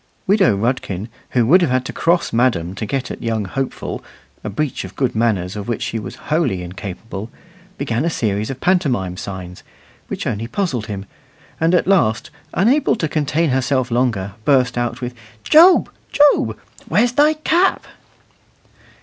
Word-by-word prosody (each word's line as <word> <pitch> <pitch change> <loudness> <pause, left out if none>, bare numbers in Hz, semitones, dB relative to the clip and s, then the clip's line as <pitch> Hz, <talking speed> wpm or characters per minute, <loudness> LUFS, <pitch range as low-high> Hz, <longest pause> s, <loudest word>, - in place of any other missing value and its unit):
Widow 190 - +3
Rudkin, 105 -3 -2 0.3
who 120 - +4
would 175 +10 +6
have 170 - +2
had 130 0 +1
to - - -5
cross 170 -5 +1
madam 115 -8 +1
to 105 +2 -5
get 135 +2 -2
at - - -7
young 110 -3 -1
Hopeful 135 +8 -4 0.4
a - - -3
breach 135 +8 -2
of 95 0 -10
good 130 +1 0
manners 105 -5 0
of 105 -1 -6
which 120 +1 -2
she 115 -1 -2
was 100 -3 -7 0.2
wholly 135 - +1
incapable 95 +3 -7 0.5
began 125 -2 -1
a 170 - +1
series 105 -7 -1
of 135 -1 -5
pantomime 135 - +1
signs, 90 -2 -7 0.5
which - - -5
only 110 +2 -2
puzzled 130 - -2
him; 100 -2 -5 0.5
and 165 +2 +3
at - - +2
last, 135 - +2 0.2
unable 250 - +3
to 165 - -1
contain 155 +1 0
herself 130 -1 0
longer, 115 -6 0
burst 125 -1 +3
out 120 0 -2
with, 125 0 -4 0.3
"Job! 345 +4 +6 0.2
Job! 290 0 +4 0.3
where's 235 +3 +3
thy 295 +4 +4
cap?" 340 +5 +1
125 Hz, 160 wpm, -19 LUFS, 105-160 Hz, 0.5 s, would